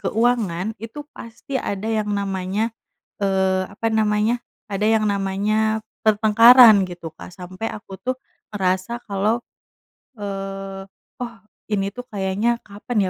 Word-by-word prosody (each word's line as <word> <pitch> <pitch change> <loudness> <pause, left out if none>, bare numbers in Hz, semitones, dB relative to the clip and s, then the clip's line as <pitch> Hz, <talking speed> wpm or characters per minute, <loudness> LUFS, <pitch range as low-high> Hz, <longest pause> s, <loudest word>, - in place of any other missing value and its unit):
keuangan 220 -4 0
itu 290 +6 -7
pasti 230 +4 -9
ada 200 +1 -3
yang 215 -2 0
namanya, 200 +2 -1 0.4
eee, 190 -1 +1
apa 225 +3 -1
namanya, 220 +1 +2 0.3
ada 205 +1 -1
yang 215 -1 +3
namanya 210 +3 0 0.2
pertengkaran 220 +1 +8
gitu, 170 -2 -7
Kak. - - -10
Sampai 185 +4 -6
aku 200 -2 -9
tuh 255 +1 -2 0.4
ngerasa 190 +4 0
kalau, 205 +3 +1 0.8
eee, 195 -1 -5 0.4
"Oh, 235 -2 -5 0.4
ini 195 -1 +1
tuh 245 - -7
kayaknya 205 +4 0
kapan 210 +3 -4
210 Hz, 120 wpm, -22 LUFS, 195-225 Hz, 0.8 s, pertengkaran